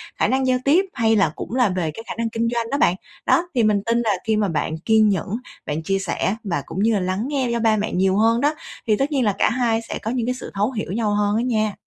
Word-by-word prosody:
khả -, -, +1 dB
năng 265 Hz, 0 st, +1 dB
giao 255 Hz, 0 st, +3 dB
tiếp, 330 Hz, +8 st, +4 dB
hay 225 Hz, -3 st, +2 dB
là 195 Hz, -7 st, +3 dB
cũng 235 Hz, -, -6 dB
là 250 Hz, -4 st, +3 dB
về 180 Hz, -4 st, -1 dB
cái 225 Hz, -, -9 dB
khả -, -, -4 dB
năng 230 Hz, 0 st, -1 dB
kinh 230 Hz, +1 st, -1 dB
doanh 230 Hz, -1 st, -1 dB
đó 280 Hz, -, +1 dB
bạn. 180 Hz, -10 st, +3 dB, 0.3 s
Đó, 350 Hz, -, +3 dB
thì 240 Hz, -, +3 dB
mình 210 Hz, -2 st, +3 dB
tin 230 Hz, 0 st, +1 dB
là 225 Hz, -3 st, +1 dB
khi 220 Hz, -1 st, +2 dB
mà 210 Hz, -, +1 dB
bạn 160 Hz, -2 st, -2 dB
kiên 215 Hz, +5 st, +3 dB
nhẫn, 195 Hz, -1 st, -1 dB, 0.4 s
bạn 150 Hz, +2 st, -3 dB
chia 195 Hz, +3 st, 0 dB
sẻ, 195 Hz, +1 st, -1 dB
và 170 Hz, -9 st, -2 dB
cũng 180 Hz, -, -6 dB
như 225 Hz, +1 st, +3 dB
là 205 Hz, -, +2 dB
lắng 185 Hz, +4 st, -2 dB
nghe 270 Hz, -4 st, -1 dB
do 235 Hz, -, 0 dB
ba 225 Hz, -1 st, +3 dB
mẹ 210 Hz, +1 st, -2 dB
nhiều 190 Hz, +1 st, +2 dB
hơn 230 Hz, +2 st, +3 dB
đó, 295 Hz, +2 st, +2 dB, 0.3 s
thì 215 Hz, -, +4 dB
tất 275 Hz, +5 st, 0 dB
nhiên 270 Hz, -4 st, +1 dB
là 205 Hz, -, +2 dB
cả -, -, +3 dB
hai 230 Hz, -1 st, +1 dB
sẽ 230 Hz, -, -6 dB
có 220 Hz, -, -3 dB
những 245 Hz, -2 st, -1 dB
cái 250 Hz, -, 0 dB
sự -, -, -8 dB
thấu 205 Hz, +5 st, 0 dB
hiểu 215 Hz, -7 st, -4 dB
nhau 210 Hz, 0 st, 0 dB
hơn 205 Hz, 0 st, +1 dB
á -, -, +1 dB
nha. 215 Hz, -4 st, 0 dB
220 Hz, 295 wpm, -22 LUFS, 200-240 Hz, 0.4 s, tiếp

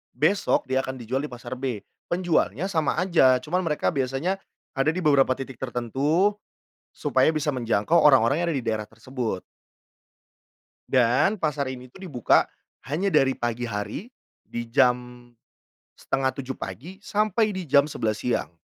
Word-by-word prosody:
besok 160 Hz, +10 st, +2 dB
dia 130 Hz, 0 st, +1 dB
akan 130 Hz, 0 st, -5 dB
dijual 120 Hz, +3 st, -2 dB
di -, -, -3 dB
pasar 125 Hz, +1 st, -7 dB
B. 125 Hz, -6 st, -3 dB, 0.2 s
Penjualnya 175 Hz, -, 0 dB
sama 160 Hz, -5 st, +1 dB
aja 165 Hz, -7 st, +4 dB
cuman 175 Hz, +6 st, 0 dB
mereka 150 Hz, -3 st, 0 dB
biasanya 140 Hz, +6 st, -1 dB, 0.3 s
ada 135 Hz, +3 st, +1 dB
di 180 Hz, +2 st, -4 dB
beberapa 140 Hz, -4 st, +4 dB
titik 135 Hz, -2 st, -8 dB
tertentu 135 Hz, -, +1 dB, 0.6 s
supaya -, -, +2 dB
bisa 150 Hz, -1 st, 0 dB
menjangkau 120 Hz, +3 st, +1 dB
orang-orang 140 Hz, 0 st, +5 dB
yang -, -, 0 dB
ada 155 Hz, -, -1 dB
di -, -, -5 dB
daerah 110 Hz, -2 st, -2 dB
tersebut. 115 Hz, -3 st, -5 dB, 1.5 s
Dan 125 Hz, -, +3 dB
pasar 150 Hz, -7 st, -1 dB
ini 130 Hz, -1 st, -7 dB
tuh -, -, -15 dB
dibuka 125 Hz, -8 st, +3 dB, 0.4 s
hanya 175 Hz, +8 st, 0 dB
dari 135 Hz, -4 st, +3 dB
pagi 120 Hz, 0 st, -2 dB
hari 105 Hz, -, -4 dB, 0.3 s
di 120 Hz, -, -6 dB
jam 125 Hz, -1 st, +1 dB, 0.7 s
6:30 130 Hz, 0 st, -2 dB
pagi 135 Hz, -, -8 dB
sampai 215 Hz, +1 st, +1 dB
di 185 Hz, -, -4 dB
jam 140 Hz, -1 st, +4 dB
11:00 110 Hz, -7 st, -2 dB
siang. 120 Hz, -8 st, -2 dB
135 Hz, 145 wpm, -25 LUFS, 125-160 Hz, 1.5 s, orang-orang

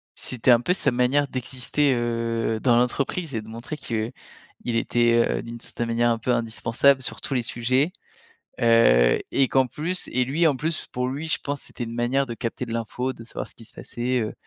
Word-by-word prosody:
c'était 125 Hz, 0 st, +1 dB
un 120 Hz, -, +7 dB
peu 180 Hz, +8 st, +2 dB
sa 140 Hz, -7 st, +1 dB
manière 125 Hz, +4 st, +2 dB
d'exister, 130 Hz, +2 st, 0 dB
heu, 115 Hz, -1 st, -1 dB
dans 120 Hz, -3 st, +4 dB
l'entreprise 140 Hz, +6 st, 0 dB
et 110 Hz, -, -1 dB
de 110 Hz, -, -14 dB
montrer 115 Hz, +7 st, -7 dB
qu'il 115 Hz, -4 st, -3 dB, 0.5 s
était, 120 Hz, 0 st, +2 dB, 0.3 s
heu, -, -, -6 dB
d'une 115 Hz, 0 st, -8 dB
certaine 120 Hz, 0 st, -4 dB
manière, 120 Hz, +1 st, +2 dB
un 115 Hz, -, +1 dB
peu 125 Hz, +2 st, -1 dB
indispensable 120 Hz, +3 st, +2 dB
sur -, -, -4 dB
tous -, -, -4 dB
les 125 Hz, -, +2 dB
sujets, 130 Hz, +7 st, +1 dB, 0.7 s
heu 115 Hz, -, +5 dB
et 135 Hz, -, +3 dB
qu'en 130 Hz, 0 st, +3 dB
plus 170 Hz, +8 st, -3 dB
et 125 Hz, 0 st, +1 dB
lui, 155 Hz, +7 st, +1 dB
en 145 Hz, -, +2 dB
plus, 155 Hz, +4 st, -2 dB
pour 125 Hz, 0 st, -1 dB
lui, 145 Hz, +5 st, -4 dB
je -, -, 0 dB
pense, 145 Hz, -1 st, -3 dB
c'était 120 Hz, -, -7 dB
une 115 Hz, +1 st, -7 dB
manière 125 Hz, +3 st, +1 dB
de 120 Hz, -, -4 dB
capter 120 Hz, +1 st, -4 dB
de 115 Hz, -, -6 dB
l'info, 115 Hz, +3 st, -2 dB
de 115 Hz, -, -12 dB
savoir 115 Hz, -, -6 dB
ce -, -, -13 dB
qui 115 Hz, -, -12 dB
se -, -, -13 dB
passait, 125 Hz, +1 st, -2 dB
heu, 110 Hz, -, -3 dB
120 Hz, 210 wpm, -24 LUFS, 115-135 Hz, 0.7 s, un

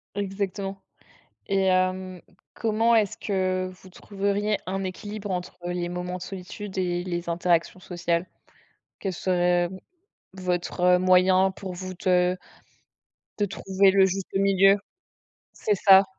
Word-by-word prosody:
Exactement. 195 Hz, -1 st, -3 dB, 0.7 s
Et 195 Hz, -1 st, +1 dB
hem, 185 Hz, 0 st, +1 dB, 0.3 s
comment 225 Hz, +1 st, +2 dB
est-ce 210 Hz, -4 st, +2 dB
que 185 Hz, -2 st, -1 dB
vous 190 Hz, -, -13 dB
trouveriez 200 Hz, +2 st, -1 dB
un 195 Hz, +1 st, -2 dB
équilibre 205 Hz, +2 st, -6 dB
entre 180 Hz, -1 st, -4 dB
les 175 Hz, 0 st, -2 dB
moments 180 Hz, +1 st, -4 dB
de -, -, -10 dB
solitude 190 Hz, +1 st, -7 dB
et 175 Hz, -1 st, 0 dB
les 175 Hz, -1 st, -4 dB
interactions 170 Hz, +1 st, +1 dB
sociales? 175 Hz, -1 st, -1 dB, 0.7 s
Quel 195 Hz, -, -3 dB
serait 175 Hz, -1 st, +1 dB, 0.7 s
votre, 180 Hz, -1 st, -2 dB
heu, -, -, +2 dB
moyen 185 Hz, +1 st, +4 dB
pour 190 Hz, 0 st, -7 dB
vous 185 Hz, +1 st, -6 dB
de 180 Hz, 0 st, +3 dB, 1.0 s
de 205 Hz, -, +2 dB
trouver 195 Hz, 0 st, +2 dB
le 195 Hz, 0 st, +5 dB
juste 190 Hz, 0 st, -2 dB
milieu? 195 Hz, 0 st, +5 dB, 0.8 s
C'est 210 Hz, -, 0 dB
ça. 195 Hz, 0 st, +7 dB
185 Hz, 125 wpm, -25 LUFS, 180-195 Hz, 1.0 s, ça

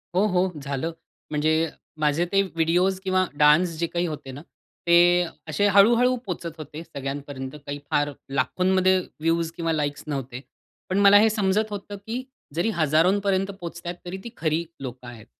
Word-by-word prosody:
हो, 190 Hz, +3 st, +4 dB
हो, 185 Hz, -1 st, +1 dB
झालं. 140 Hz, +3 st, -3 dB, 0.4 s
म्हणजे 155 Hz, +2 st, +1 dB, 0.3 s
माझे 155 Hz, +3 st, +2 dB
ते 195 Hz, 0 st, +4 dB
व्हिडिओस 180 Hz, +1 st, +1 dB
किंवा 185 Hz, -1 st, +2 dB
डान्स 150 Hz, +4 st, +5 dB
जे 170 Hz, -, 0 dB
काही 175 Hz, +1 st, -1 dB
होते 150 Hz, -4 st, -6 dB
ना 135 Hz, +3 st, -9 dB, 0.5 s
ते 175 Hz, +1 st, +6 dB, 0.2 s
असे 155 Hz, +6 st, +1 dB
हळू-हळू 235 Hz, +6 st, +5 dB
पोहचत 170 Hz, -3 st, -5 dB
होते 155 Hz, +1 st, -8 dB
सगळ्यांपर्यंत 140 Hz, -2 st, -6 dB
काही 145 Hz, 0 st, -5 dB
फार 145 Hz, 0 st, +1 dB, 0.2 s
लाखोंमध्ये 185 Hz, +7 st, +2 dB
व्ह्यूज 165 Hz, -1 st, -2 dB
किंवा 165 Hz, -1 st, -1 dB
लाइक्स 145 Hz, -2 st, -2 dB
नव्हते. 135 Hz, -3 st, -4 dB, 0.5 s
पण 190 Hz, +2 st, +1 dB
मला 200 Hz, 0 st, +8 dB
हे 220 Hz, +1 st, +5 dB
समजत 210 Hz, 0 st, +1 dB
होतं 205 Hz, 0 st, -6 dB
की 240 Hz, +3 st, -3 dB, 0.3 s
जरी 175 Hz, +7 st, +1 dB
हजारोंपर्यंत 185 Hz, +5 st, +2 dB
पोहोचतायेत 175 Hz, -2 st, -7 dB
तरी 180 Hz, +2 st, -5 dB
ती 235 Hz, -, -6 dB
खरी 160 Hz, +1 st, 0 dB, 0.2 s
लोकं 125 Hz, -1 st, -7 dB
आहेत. 115 Hz, -3 st, -11 dB
170 Hz, 155 wpm, -24 LUFS, 150-190 Hz, 0.5 s, मला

